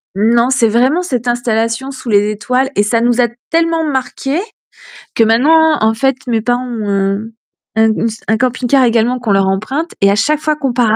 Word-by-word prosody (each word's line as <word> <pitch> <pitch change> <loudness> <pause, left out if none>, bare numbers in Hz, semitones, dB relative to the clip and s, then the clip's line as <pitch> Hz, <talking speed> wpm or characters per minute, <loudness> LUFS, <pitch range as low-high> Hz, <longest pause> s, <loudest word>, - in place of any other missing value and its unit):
Mmh, 220 +4 +2
non, 235 +2 +3
c'est 260 -3 +2
vraiment 255 +10 +2
cette 250 -8 -3
installation 240 +1 -1
sous 260 -2 -8
les 205 0 +2
étoiles 250 +5 -1
et 205 - +2
ça 230 +3 +1
nous 240 +1 +2
a 240 - +3 0.2
tellement 330 0 +1
marqués 270 +2 -2 0.8
que 230 - +4
maintenant 305 +8 +3
en 220 0 +3
fait 270 +4 0
mes 230 -2 0
parents 245 +2 -1
ont 200 -3 -2 0.5
ont 220 0 +3
ont - - -1
s 225 0 -7
un 220 - +1
camping-car 255 +2 +1
également 240 +2 +1
qu'on 230 -3 -2
leur 195 -1 +2
emprunte 260 - -3
et 200 - +5
à 200 - +2
chaque 290 +8 +1
fois 305 0 -1
qu'on 275 -3 -2
part 230 -3 +2
240 Hz, 205 wpm, -14 LUFS, 220-270 Hz, 0.8 s, et